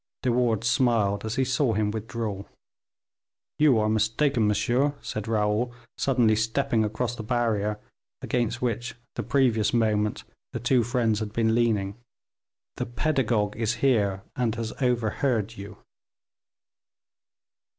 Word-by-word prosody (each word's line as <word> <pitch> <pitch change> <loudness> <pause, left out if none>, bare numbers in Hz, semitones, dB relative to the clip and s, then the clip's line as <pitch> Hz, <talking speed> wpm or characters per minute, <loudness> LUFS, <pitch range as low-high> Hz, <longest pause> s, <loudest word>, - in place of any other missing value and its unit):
De 125 - +2
Wardes 115 -2 +1
smiled 115 -6 +2
as 110 +1 -3
he 130 - +1
saw 130 -2 +1
him 105 0 0
withdraw. 110 -2 -4 1.2
"You 150 -5 +5
are 110 0 +2
mistaken, 110 +3 +1
monsieur," 125 +7 +1
said 110 0 -5
Raoul, 110 +2 0 0.2
suddenly 120 -5 +2
stepping 115 +1 +1
across 115 +3 -2
the 115 - -6
barrier 110 -3 0 0.4
against 120 0 -1
which 120 0 -2 0.2
the - - -3
previous 120 -6 +2
moment 105 -2 +1 0.3
the - - -3
two 125 0 +3
friends 115 -2 +1
had 110 -2 -4
been 110 -1 +2
leaning. 110 -4 +1 0.8
"The - - -3
pedagogue 120 -6 0
is 115 +1 -1
here, 100 -7 +2
and 120 -3 0
has 115 0 -4
overheard 120 -2 0
you." 100 0 -9
115 Hz, 130 wpm, -26 LUFS, 105-125 Hz, 1.2 s, You